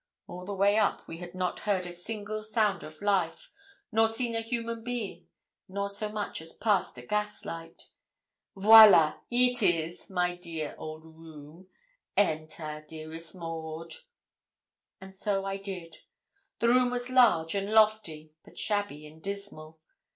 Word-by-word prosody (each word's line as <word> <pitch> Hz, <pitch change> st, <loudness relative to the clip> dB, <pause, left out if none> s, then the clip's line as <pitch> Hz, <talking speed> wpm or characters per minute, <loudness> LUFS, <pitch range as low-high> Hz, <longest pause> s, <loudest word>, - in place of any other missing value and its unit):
All 180 Hz, +1 st, -8 dB
the 200 Hz, +1 st, -4 dB
way 200 Hz, +2 st, +3 dB
up 210 Hz, -, 0 dB
we 165 Hz, -, -7 dB
had 175 Hz, 0 st, -9 dB
not 185 Hz, -1 st, -2 dB
heard 195 Hz, -4 st, 0 dB
a 175 Hz, -, -6 dB
single 215 Hz, +4 st, -5 dB
sound 215 Hz, -4 st, +1 dB
of 155 Hz, +5 st, -11 dB
life, 190 Hz, -5 st, 0 dB, 0.4 s
nor 225 Hz, 0 st, +4 dB
seen 230 Hz, +1 st, -1 dB
a 225 Hz, -, 0 dB
human 230 Hz, 0 st, -3 dB
being, 240 Hz, -4 st, -5 dB, 0.4 s
nor 200 Hz, +1 st, -2 dB
so 210 Hz, +1 st, -1 dB
much 210 Hz, -5 st, -4 dB
as 165 Hz, 0 st, -9 dB
passed 205 Hz, -, 0 dB
a 125 Hz, -, -9 dB
gaslight. 185 Hz, -4 st, -4 dB, 0.7 s
'Viola! 200 Hz, -6 st, +8 dB
here 250 Hz, +1 st, +3 dB
'tis, 175 Hz, -6 st, 0 dB
my 180 Hz, -2 st, 0 dB
dear 165 Hz, -4 st, -6 dB
old 155 Hz, 0 st, -8 dB
room. 160 Hz, +1 st, -14 dB, 0.5 s
Enter, 155 Hz, -4 st, -1 dB
dearest 160 Hz, +2 st, -8 dB
Maud.' 165 Hz, -1 st, -6 dB, 1.1 s
And 190 Hz, 0 st, -12 dB
so 195 Hz, 0 st, -1 dB
I 195 Hz, 0 st, -2 dB
did. 185 Hz, -5 st, -8 dB, 0.6 s
The 235 Hz, -, +2 dB
room 250 Hz, +1 st, +4 dB
was 245 Hz, 0 st, -3 dB
large 175 Hz, -11 st, +4 dB
and 200 Hz, +1 st, -2 dB
lofty, 210 Hz, -9 st, +2 dB
but -, -, -18 dB
shabby 205 Hz, -8 st, -1 dB
and 155 Hz, +1 st, -14 dB
dismal. 195 Hz, -6 st, -6 dB
190 Hz, 145 wpm, -29 LUFS, 165-215 Hz, 1.1 s, Viola